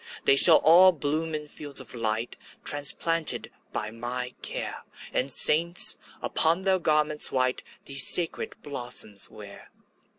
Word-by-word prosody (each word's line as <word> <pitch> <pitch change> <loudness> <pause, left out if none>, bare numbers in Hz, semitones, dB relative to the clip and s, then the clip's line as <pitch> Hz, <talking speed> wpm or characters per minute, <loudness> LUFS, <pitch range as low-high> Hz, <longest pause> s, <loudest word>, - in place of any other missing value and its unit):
``They 135 - +3
shall 160 +3 +7
all 180 +4 +5
bloom 155 +1 -4
in 150 0 -8
fields 145 -1 -2
of - - -10
light, 115 0 -4 0.3
Transplanted 155 +3 0 0.2
by 105 0 -5
my 125 +2 -7
care, - - -5 0.3
And 130 - -2
saints, 170 +6 +5 0.3
upon 165 +4 +2
their 190 -1 0
garments 150 -2 +1
white, 130 -1 -2 0.2
These 140 -2 0
sacred 170 -2 -1
blossoms 120 -7 -2
wear.'' 100 -2 -14
145 Hz, 130 wpm, -24 LUFS, 125-165 Hz, 0.3 s, shall